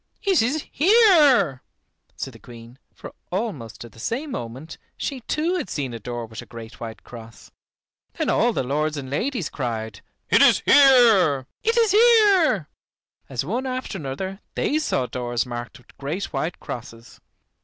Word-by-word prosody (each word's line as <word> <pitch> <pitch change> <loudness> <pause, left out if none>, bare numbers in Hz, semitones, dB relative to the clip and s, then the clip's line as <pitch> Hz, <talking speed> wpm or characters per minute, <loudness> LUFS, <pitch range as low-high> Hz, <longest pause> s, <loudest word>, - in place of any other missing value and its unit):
it 390 - +3
is 275 +7 -1
here," 305 - +5 0.5
said 135 - -6
the 115 - -14
Queen, 120 +2 -14
for - - -11 0.2
almost 165 - -4
at 120 - -13
the 115 - -17
same 270 - -3
moment 130 - -7 0.2
she 275 -3 -4
too 335 +5 0
had 290 - -4
seen 135 -5 -4
a 115 - -6
door 120 +2 -5
with 110 0 -9
a - - -12
great 115 -1 -11
white 110 -1 -8
cross. 115 -1 -13 0.6
Then - - -3
all - - +2
the - - -2
lords 150 +4 -1
and 135 -2 -7
ladies 225 - -2
cried: 110 -6 -4 0.3
"It - - +5
is - - +5
here, 225 - +5 0.2
it 455 +1 0
is 455 -3 +4
here," 405 - +4 0.6
as 130 0 -3
one 245 - -2
after 255 0 -4
another 175 +8 -5 0.2
they 305 - 0
saw 130 - -1
doors 120 -1 -3
marked 120 -1 -7
with 125 - -22
great 155 +8 -4
white 170 - -3
crosses. 115 -1 -9
150 Hz, 165 wpm, -23 LUFS, -, 0.6 s, here